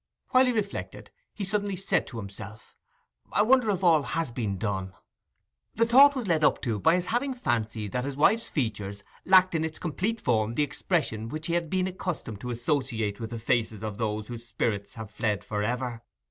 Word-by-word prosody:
While 255 0 +5
he - - +3
reflected, 210 -4 -4 0.2
he 205 - -6
suddenly 205 0 0
said 190 +2 0
to 120 - -8
himself, 105 +1 -9 0.6
I 210 - +3
wonder 250 0 +4
if 195 -2 0
all 165 -4 +5
has 160 -1 -2
been 110 -5 -2
done? 95 -2 -3 0.8
The 230 - +3
thought 275 +5 +7
was 250 -5 -3
led 160 -3 +2
up - - +4
to 115 -6 -1
by 160 - +4
his 180 -1 0
having 245 +6 -1
fancied 110 - -2
that 125 - -1
his 140 -1 -4
wife's 220 +10 +3
features 105 -7 -3 0.2
lacked 185 -1 +6
in 160 -1 0
its 160 -1 -3
complete 185 - -2
form 115 - +1
the 150 - +3
expression 140 - -1
which 155 +4 -5
he 170 - -1
had 170 -2 0
been 185 +1 +1
accustomed 180 - -4
to 125 - -5
associate 120 -4 -1
with 115 -1 -5
the 115 - -5
faces 110 -2 0
of 110 0 -5
those 110 -2 -1
whose 120 -1 -6
spirits 115 -3 -2
have 110 -2 -8
fled 105 -4 -1
for 105 -1 -3
ever. 120 +1 -2
125 Hz, 200 wpm, -27 LUFS, 110-185 Hz, 0.8 s, thought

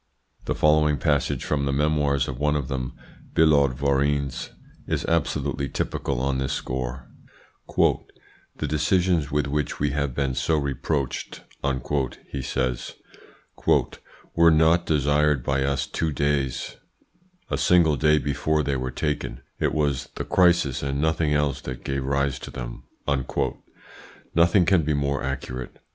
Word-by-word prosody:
The - - -1
following 75 -1 +3
passage 70 +2 0
from 70 -2 0
the 70 - 0
memoirs 75 -1 +1
of 65 -1 -5
one 75 0 +2
of 70 -2 -2
them, 65 -2 -3 0.4
Billaud 70 -5 +4
Varennes, 70 0 0 0.4
is - - -1
absolutely 70 -3 0
typical 70 -3 -2
on 65 0 0
this 65 - -1
score: 65 0 -4 0.7
"The 75 - -2
decisions 80 +1 +1
with 75 0 0
which 75 -1 -2
we 75 0 +1
have 70 -3 -2
been 70 -2 0
so 80 +4 +1
reproached," 70 -1 -2 0.9
he 70 - -3
says, 65 -1 -2 1.4
"WERE 85 0 +6
NOT 80 +2 +4
DESIRED 75 -2 +2
BY 70 +1 +1
US 70 0 0
TWO 80 -2 -2
DAYS, 70 -3 -1 0.7
A - - +1
SINGLE 85 -4 +4
DAY 75 +4 +4
BEFORE 75 +2 0
THEY 70 -1 0
WERE 65 0 -3
TAKEN: 65 -2 -3 0.2
IT - - +1
WAS 70 -2 0
THE - - -4
CRISIS 85 -7 +3
AND 70 0 -2
NOTHING 80 -1 +1
ELSE 75 -2 0
THAT 65 -1 -7
GAVE 70 -1 -2
RISE 70 0 0
TO - - -8
THEM." - - -7 1.5
Nothing 85 +2 +4
can 95 -1 +4
be 75 -1 0
more 70 -1 0
accurate. 65 -1 -5
70 Hz, 140 wpm, -25 LUFS, 70-75 Hz, 1.5 s, WERE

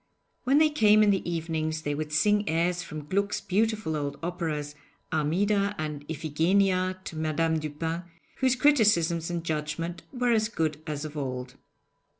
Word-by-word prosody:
When 270 +3 +4
they 310 0 +5
came 215 -7 +5
in 205 - +5
the 190 -3 -1
evenings, 160 -1 -2
they 145 - -1
would 150 +1 -4
sing 205 +6 +2
airs 170 +2 +1
from 155 -4 -7
Gluck's 200 +5 0
beautiful 215 -4 0
old 145 -1 -3
operas 155 -4 -3 0.4
'Armida' 200 +7 +1
and 150 -2 -4
'Iphigenia' 185 +5 +1
to 165 - -7
Madame 160 +1 0
Dupin, 160 +3 -4 0.3
whose 260 -1 +2
criticisms 205 - +3
and 170 -1 -3
judgment 165 +2 -3
were 245 -2 0
as 215 -1 +2
good 155 -7 -2
as 150 0 -3
of 155 0 -7
old. 130 -3 -4
165 Hz, 150 wpm, -27 LUFS, 155-200 Hz, 0.4 s, they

